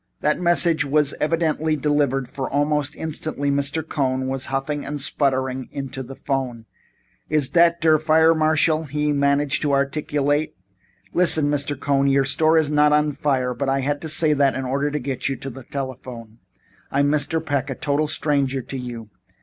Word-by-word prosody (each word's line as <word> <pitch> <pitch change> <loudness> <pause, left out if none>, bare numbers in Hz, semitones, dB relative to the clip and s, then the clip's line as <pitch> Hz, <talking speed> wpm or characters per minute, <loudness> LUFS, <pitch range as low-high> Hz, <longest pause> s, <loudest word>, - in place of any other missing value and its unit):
That 150 - +1
message 170 -3 +3
was 145 0 +2
evidently 160 0 0
delivered 145 -3 0
for 135 +1 -5
almost 145 0 0
instantly 155 -2 -2
Mr. 140 +3 0
B. - - -26
Cohn 130 -2 -1
was 135 0 -2
puffing 135 +2 -3
and 145 +1 -5
spluttering 130 -2 -1
into 135 -1 -5
the 135 +1 -9
phone. 130 -5 -3 0.6
"Iss 150 -4 +2
dot 170 -1 +3
der 155 -1 +4
fire 160 +1 +4
marshal?" 155 0 +2
he 150 0 -1
managed 140 0 +1
to 145 -2 0
articulate. 145 +1 0 0.6
"Listen, 160 -4 +3
Mr. 145 -1 -2
Cohn. 140 -1 +1
Your 135 0 +3
store 155 +3 +3
is 155 -2 +1
not 150 0 +4
on 150 0 +2
fire, 130 -3 -1
but 135 +3 -2
I 135 0 +1
had 145 +2 -2
to 160 - -4
say 155 0 +3
so 140 - +2
in 130 -1 -2
order 140 +3 -1
to 150 - -3
get 135 -2 -3
you 135 - -2
to 135 +1 -7
the 130 0 -11
telephone. 125 -4 -7 0.5
I 140 - +1
am 145 - +2
Mr. 150 +2 0
Peck, 140 -2 -1
a 135 - -3
total 145 +3 -1
stranger 140 -4 0
to 135 - -6
you. 120 -3 -8
145 Hz, 180 wpm, -22 LUFS, 135-150 Hz, 0.6 s, der